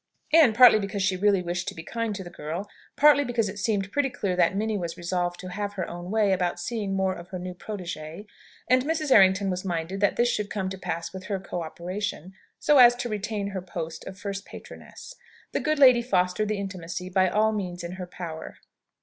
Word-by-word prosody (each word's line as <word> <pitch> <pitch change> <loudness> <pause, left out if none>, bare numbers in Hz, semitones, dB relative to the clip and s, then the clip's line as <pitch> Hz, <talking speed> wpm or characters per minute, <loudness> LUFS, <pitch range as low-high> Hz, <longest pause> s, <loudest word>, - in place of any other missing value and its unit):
And 300 -9 +6
partly 245 -2 +8
because 200 -1 -3
she 190 -1 +2
really 195 0 +2
wished 175 0 -3
to - - -4
be 160 - -8
kind 230 +2 -3
to 195 - -6
the 175 - -10
girl, 165 +7 -5 0.3
partly 290 0 +6
because 240 -4 0
it 200 +2 -7
seemed 200 -2 -1
pretty 285 -1 +1
clear 195 -7 -2
that 180 +1 +2
Minnie 215 +1 -1
was 170 -2 -5
resolved 175 0 -2
to 185 - -7
have 205 +2 -4
her 190 -3 -3
own 175 +1 -7
way 210 -1 +2
about 180 -2 0
seeing 205 0 -3
more 190 -1 +1
of 170 -1 -10
her 185 - -6
new 180 0 -6
protégée, 180 -2 -7 0.4
and 255 +1 +4
Mrs. 310 0 -1
Errington 190 -2 +5
was 180 0 -3
minded 175 +1 -3
that 205 0 +2
this 240 - +3
should 210 -3 -1
come 190 -3 -2
to 190 - -6
pass 170 -2 -4
with 190 0 -8
her 200 -1 -2
co 180 -2 -5
operation, 180 +2 -5 0.3
so 295 -2 +4
as 245 -1 +8
to 245 0 -4
retain 210 -1 -3
her 195 -2 -4
post 165 -3 -6
of 190 - -8
first 200 0 -5
patroness - - -11 0.4
the - - -1
good 310 0 0
lady 255 -4 +7
fostered 185 -2 +1
the 215 0 -1
intimacy 185 -2 -5
by 185 0 +2
all 215 +3 +2
means 180 -4 -4
in 170 - -5
her 185 -1 -7
power. 165 -3 -8
195 Hz, 220 wpm, -26 LUFS, 180-215 Hz, 0.4 s, partly